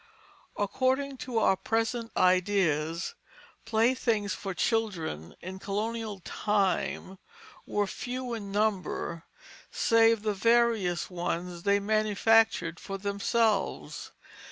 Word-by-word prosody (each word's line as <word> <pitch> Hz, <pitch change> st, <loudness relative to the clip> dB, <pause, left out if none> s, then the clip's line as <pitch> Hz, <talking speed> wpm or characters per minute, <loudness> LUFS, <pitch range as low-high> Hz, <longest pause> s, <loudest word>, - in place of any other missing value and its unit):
According 260 Hz, +6 st, 0 dB
to 245 Hz, -1 st, -4 dB
our 210 Hz, -3 st, +4 dB
present 225 Hz, +3 st, -1 dB
ideas, 180 Hz, -, +2 dB, 0.5 s
playthings 225 Hz, -2 st, +1 dB
for 195 Hz, -2 st, -5 dB
children 175 Hz, -, -1 dB
in 190 Hz, +1 st, -7 dB
colonial 210 Hz, 0 st, -3 dB
time 195 Hz, -1 st, -1 dB, 0.5 s
were 205 Hz, 0 st, +1 dB
few 250 Hz, +4 st, -5 dB
in 205 Hz, -3 st, -5 dB
number, 195 Hz, -5 st, -1 dB, 0.4 s
save 225 Hz, -1 st, +3 dB
the 215 Hz, -1 st, +1 dB
various 220 Hz, -4 st, +2 dB
ones 175 Hz, 0 st, -3 dB
they 200 Hz, +2 st, +3 dB
manufactured 215 Hz, -3 st, +2 dB
for 195 Hz, -, -5 dB
themselves. 200 Hz, +1 st, -1 dB
205 Hz, 95 wpm, -29 LUFS, 190-225 Hz, 0.5 s, our